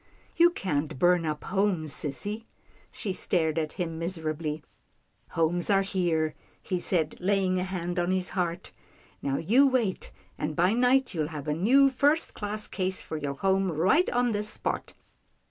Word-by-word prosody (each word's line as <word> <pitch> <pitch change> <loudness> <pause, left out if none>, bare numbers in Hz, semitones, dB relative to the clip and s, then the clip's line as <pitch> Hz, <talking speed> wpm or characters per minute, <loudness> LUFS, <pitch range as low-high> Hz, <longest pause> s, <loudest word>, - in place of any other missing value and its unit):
" - - -32
You 345 - +8
can't 150 - -2
burn 175 +1 +3
up 150 -1 -3
homes, 185 -6 0
sissy." 205 +10 -2 0.5
She 200 -4 -3
stared 165 -3 0
at 155 -1 -3
him 165 -3 -4
miserably. 160 -3 -3 0.3
" - - -43
Homes 165 +3 +1
are 195 -1 +4
here," 170 -5 0 0.3
he 185 -2 -3
said 175 -3 -1
laying 185 -1 +1
a - - -1
hand 180 -1 -3
on 175 0 0
his 185 -1 0
heart. 175 -2 -2 0.3
" - - -30
Now 135 -1 -1
you 245 - +4
wait, 240 -8 -1 0.3
and, 150 0 -2
by 180 +6 +3
night, 250 +2 +3
you'll 155 -4 -1
have 150 -2 -7
a 150 - +1
new, 260 - +4
first 290 +5 +2
class 210 0 -3
case 185 -1 -2
for 160 - -5
your 140 -2 -3
home 190 +3 +1
right 185 - +3
on 245 0 +1
this 210 0 0
spot." - - -3
180 Hz, 175 wpm, -28 LUFS, 160-205 Hz, 0.5 s, You